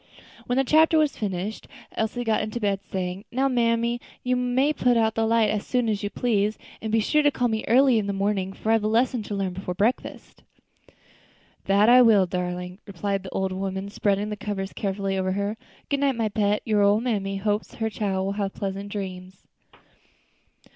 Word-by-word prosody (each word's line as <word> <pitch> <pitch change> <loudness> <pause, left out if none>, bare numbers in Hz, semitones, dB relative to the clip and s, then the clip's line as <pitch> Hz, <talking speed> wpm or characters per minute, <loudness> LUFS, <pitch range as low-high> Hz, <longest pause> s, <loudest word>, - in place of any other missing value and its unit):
When 245 - 0
the 270 - +4
chapter 315 +4 +4
was 305 -2 +2
finished 200 +1 -4 0.2
Elsie 220 +2 -2
got 225 -2 +1
into 215 +2 -4
bed, 200 -3 0
saying, 185 +1 -3
"Now, 265 +3 +1
mammy, 235 -1 +1 0.2
you 250 0 +1
may 250 +4 +1
put 245 -4 +2
out 220 -1 +2
the 225 0 0
light 225 -2 +3
as 210 -1 -2
soon 245 -2 0
as 210 -2 -1
you 205 - -2
please; 215 -2 0 0.2
and 220 - -3
be 225 - +3
sure 300 +8 +2
to 295 - +4
call 250 -3 0
me 220 -1 -2
early 255 0 +5
in 205 - -3
the - - 0
morning, 195 -1 -1
for 215 +3 -2
I - - +5
have 225 -2 +2
a - - +1
lesson 235 +2 +1
to 210 0 -5
learn 195 -2 -2
before 180 -1 -5
breakfast." 220 +7 -2 1.2
"That 200 +2 +4
I 250 +1 +8
will, 215 -5 +6
darlin'," 180 +1 -4
replied 200 +1 -2
the 190 - -8
old 190 0 -2
woman, 190 +1 -4
spreading 205 0 0
the - - -2
cover 205 -1 -4
carefully 195 0 -3
over 185 0 0
her. 200 +2 -2 0.3
"Good 280 - 0
night, 275 -2 +2
my 225 -2 0
pet, 205 0 0
your 215 -2 +2
ole 205 +1 +4
mammy 200 -5 -2
hopes 205 +1 -2
her 225 -1 -2
chile 200 -2 -2
will 195 - -1
have 200 -1 -3
pleasant 200 0 -4
dreams." 185 -2 -7
210 Hz, 200 wpm, -25 LUFS, 195-235 Hz, 1.2 s, I